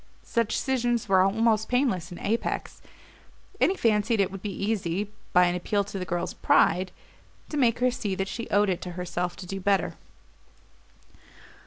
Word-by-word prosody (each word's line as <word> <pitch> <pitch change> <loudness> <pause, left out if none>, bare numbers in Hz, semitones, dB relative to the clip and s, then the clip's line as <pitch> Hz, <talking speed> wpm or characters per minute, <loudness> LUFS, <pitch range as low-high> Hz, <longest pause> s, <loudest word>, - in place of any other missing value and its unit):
Such 230 -2 0
scissions 240 -4 0
were 190 -1 +5
almost 220 +2 +2
painless 235 - +1
in 175 - -7
Apex, 225 +3 -2 0.8
and - - +4
he 385 - 0
had - - -15
fancied 220 0 +2
it 195 -2 +2
would 195 -1 -7
be 205 - -4
easy, 200 -1 -2 0.2
by 180 0 +6
an 175 - +1
appeal 200 +3 0
to 200 -1 -6
the 180 - -3
girl's 175 0 -2
pride, 185 0 +3 0.6
to - - -5
make 240 -5 +3
her 250 +1 +2
see 205 -5 -3
that 195 0 -2
she 230 +3 -5
owed 205 0 +3
it 180 - -3
to 180 - -5
herself 180 0 -3
to 185 - -9
do 195 +2 -5
better. 195 0 +1
200 Hz, 180 wpm, -27 LUFS, 180-230 Hz, 0.8 s, by